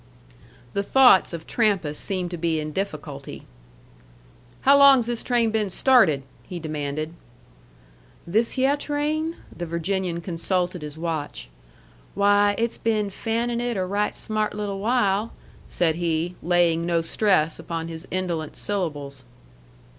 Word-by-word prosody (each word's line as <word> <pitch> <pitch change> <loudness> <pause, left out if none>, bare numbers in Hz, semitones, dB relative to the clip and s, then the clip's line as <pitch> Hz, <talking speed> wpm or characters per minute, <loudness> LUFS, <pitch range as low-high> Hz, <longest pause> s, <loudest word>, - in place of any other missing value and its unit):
The 200 - 0
thoughts 250 -1 +5
of 165 -2 -7
Trampas 195 -10 0
seemed 185 -3 -3
to 175 - -4
be 165 -1 0
in 155 0 -4
difficulty. 150 -6 -5 1.2
"How 275 +1 +6
long's 275 -4 +7
this 240 -1 -3
train 235 -3 +1
been 215 -2 0
started?" 185 - +4 0.2
he 180 - -8
demanded. 155 -1 -4 1.1
"This 220 +7 +1
hyeh 270 +2 +2
train?" 305 +3 -1 0.2
The 175 - -5
Virginian 170 +1 -2
consulted 180 +1 -2
his 150 0 -8
watch. 160 - -4 0.7
"Why, 205 0 +4
it's 230 0 -1
been 215 -3 0
fanning 235 +3 -2
it 240 -3 -2
a 185 - 0
right 205 +3 -1
smart 215 -1 -2
little 205 -2 -3
while," 215 -1 +1 0.3
said 165 -2 +1
he, 170 0 -1
laying 170 -1 +2
no 170 -1 +1
stress 165 -2 +1
upon 165 0 -4
his 165 +1 -8
indolent 175 -4 -3
syllables. 145 -9 -4
185 Hz, 130 wpm, -24 LUFS, 165-220 Hz, 1.2 s, long's